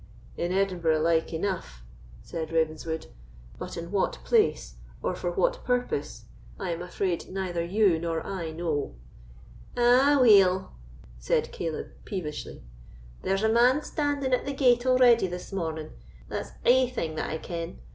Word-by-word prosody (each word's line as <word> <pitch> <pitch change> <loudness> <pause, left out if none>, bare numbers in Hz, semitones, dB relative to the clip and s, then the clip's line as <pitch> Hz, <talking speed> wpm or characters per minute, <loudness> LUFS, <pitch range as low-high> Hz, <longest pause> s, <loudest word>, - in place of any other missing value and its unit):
"In 175 +1 -2
Edinburgh 180 -5 +1
like 165 0 +2
enough," 165 - -4 0.4
said 160 -1 -5
Ravenswood; 160 0 -1 0.5
"but - - -6
in 170 +1 -6
what 200 -2 +1
place, 450 -3 +1 0.3
or - - 0
for - - -3
what - - 0
purpose, 250 - -2 0.3
I 185 -3 -2
am 170 0 -4
afraid 180 0 -2
neither 185 -3 -2
you 185 -1 +3
nor 165 -1 -3
I 180 -4 -4
know." 160 - -3 0.8
"Aweel!" 240 -7 +5 0.5
said - - 0
Caleb, 165 -2 -4
peevishly, 160 -7 -6 0.6
"there's 195 +2 0
a 220 - +3
man 250 +6 +4
standing 285 -3 -1
at 250 - +2
the 280 - -1
gate 250 -2 +3
already 245 -5 +5
this 180 +2 -7
morning—that's 160 -4 -6 0.2
ae 255 0 +5
thing 165 -11 -3
that 155 - -3
I 160 - -2
ken. 170 +1 -6
185 Hz, 135 wpm, -27 LUFS, 165-245 Hz, 0.8 s, Aweel